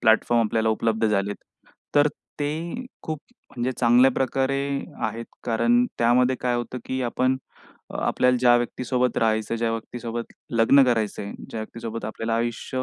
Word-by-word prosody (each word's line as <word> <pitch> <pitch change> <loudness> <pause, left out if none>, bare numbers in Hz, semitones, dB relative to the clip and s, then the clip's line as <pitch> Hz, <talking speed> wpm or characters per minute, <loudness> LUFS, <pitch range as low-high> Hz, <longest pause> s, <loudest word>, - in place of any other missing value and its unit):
Platform 115 +1 +4
आपल्याला 110 +1 +1
उपलब्ध 110 0 +1
झालेत. 105 -1 0 0.6
तर 145 0 +5 0.3
ते 165 - -3 0.2
खूप 155 -2 -4 0.3
म्हणजे 125 +2 -2
चांगल्या 125 +2 +6
प्रकारे 135 +1 0 0.5
आहेत, 115 +2 -5 0.2
कारण 120 +1 +3
त्यामध्ये 125 +2 +3
काय 125 -1 +1
होतं, 120 +1 -4
की 130 0 -3
आपण 130 +2 +1 0.6
आपल्याला 125 0 +2
ज्या 120 -1 +6
व्यक्तीसोबत 125 +1 -1
राहायचं 110 0 +1
ज्या 115 0 0
व्यक्तीसोबत 115 +1 -5 0.2
लग्न 120 +4 +5
करायचं 110 -5 0
आहे 100 - -6 0.2
ज्या 110 - -4
व्यक्तीसोबत 115 0 -6
आपल्याला 115 +1 -2
आयुष्य 120 +2 -2
120 Hz, 140 wpm, -24 LUFS, 115-125 Hz, 0.6 s, चांगल्या